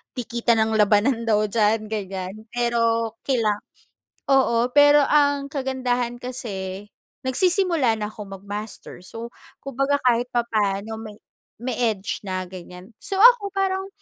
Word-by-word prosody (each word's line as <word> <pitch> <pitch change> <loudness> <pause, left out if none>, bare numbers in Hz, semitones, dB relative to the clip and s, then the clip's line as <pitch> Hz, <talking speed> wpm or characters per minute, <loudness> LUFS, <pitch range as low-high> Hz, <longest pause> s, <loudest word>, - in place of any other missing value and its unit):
dikitan 235 -1 0
ang 220 0 -1
labanan 215 +4 +3
daw 215 -1 +3
diyan 215 0 +1
ganyan. 190 -3 -4 0.2
Pero 230 -1 0
kailan 225 -6 +1 0.7
oo. 245 -3 +3
Pero 290 0 +7
ang 285 -1 +2
kagandahan 255 -3 -2
kasi, 205 -6 -6 0.4
nagsisimula 340 - +2
na 210 - -2
ako 195 -2 -8
mag-master, 205 -1 -7
so 230 +4 -8 0.3
kumbaga 275 +1 0
kahit 245 0 +2
papaano 220 -2 -1
may 215 -2 -9 0.4
may 245 -2 -3 0.2
edge 195 -1 -5
na 185 0 -3
ganyan. 180 +3 -11
So 390 - -4
ako 470 -3 +7
parang 385 0 -1
235 Hz, 125 wpm, -23 LUFS, 210-265 Hz, 0.7 s, Pero